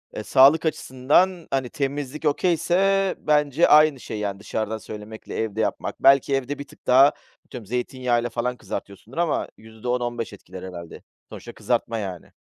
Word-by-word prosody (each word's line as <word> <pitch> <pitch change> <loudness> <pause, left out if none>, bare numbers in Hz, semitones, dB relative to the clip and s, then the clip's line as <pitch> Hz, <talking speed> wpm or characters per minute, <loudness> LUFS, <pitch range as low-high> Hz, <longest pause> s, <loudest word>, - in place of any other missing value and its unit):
eee, 105 - -4
sağlık 140 +7 +5
açısından, 155 +5 +1
hani, 135 -2 -1
temizlik 145 0 -4
okay'se 180 +5 +2
bence 150 +1 +2
aynı 150 -2 +5
şey, 110 - -6
yani, 100 -1 -3
dışarıdan 110 +1 -3
söylemekle 110 0 -9
evde 110 0 -2
yapmak. - - -3
Belki 135 0 +5
evde 135 +2 -3
bir 140 - -7
tık - - -20
daha 135 +3 +7 0.3
atıyorum 120 -4 -9
zeytinyağıyla 125 0 -1
falan 125 +1 -2
kızartıyorsundur 100 - -8
ama 170 -2 0
%10-15 120 +1 -4
etkiler 95 -2 -11
herhâlde. 85 -3 -9 0.3
Sonuçta - - -10
kızartma, 115 - -1
yani. 95 -5 -6
125 Hz, 145 wpm, -23 LUFS, 110-150 Hz, 0.3 s, daha